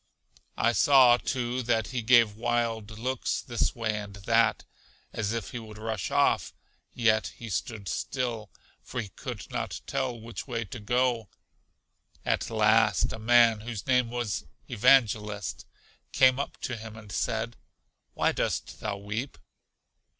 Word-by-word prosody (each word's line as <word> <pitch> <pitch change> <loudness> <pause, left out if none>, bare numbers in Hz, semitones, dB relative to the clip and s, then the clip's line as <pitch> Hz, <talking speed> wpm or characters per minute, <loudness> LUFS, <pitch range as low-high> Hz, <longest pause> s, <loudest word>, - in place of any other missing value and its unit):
I 115 - +3
saw, 125 -1 +6
too, 125 -1 -2
that 115 -3 0
he 125 -2 -2
gave 115 -2 +5
wild 115 -2 -1
looks 130 +2 -1
this 120 -2 -1
way 110 -3 -1
and 105 -1 -8
that, 100 -1 +2 0.5
as 105 -1 -1
if 115 0 -4
he 125 - -5
would 110 -2 -11
rush 110 -3 -3
off; - - +2 0.4
yet 110 -2 +3
he 115 -2 -8
stood 100 +2 -3
still, 120 -5 -3 0.3
for 125 - -6
he 110 -4 -4
could - - -8
not - - -3
tell 125 -3 -2
which 115 +4 -8
way 115 -3 -3
to 110 +5 -8
go. 120 -1 0 1.0
At - - 0
last, 110 -2 +3
a 110 - -6
man, 115 -1 +5
whose 115 -1 -6
name 125 -2 +2
was 120 -8 -2 0.2
Evangelist, 105 -5 +2 0.4
came 130 0 +5
up 140 - -4
to 130 - -3
him 110 0 -9
and 105 -1 -12
said, 115 +1 -2 0.6
Why - - +2
dost - - -2
thou 105 -2 -3
weep? 110 +7 -5
115 Hz, 145 wpm, -28 LUFS, 110-120 Hz, 1.0 s, saw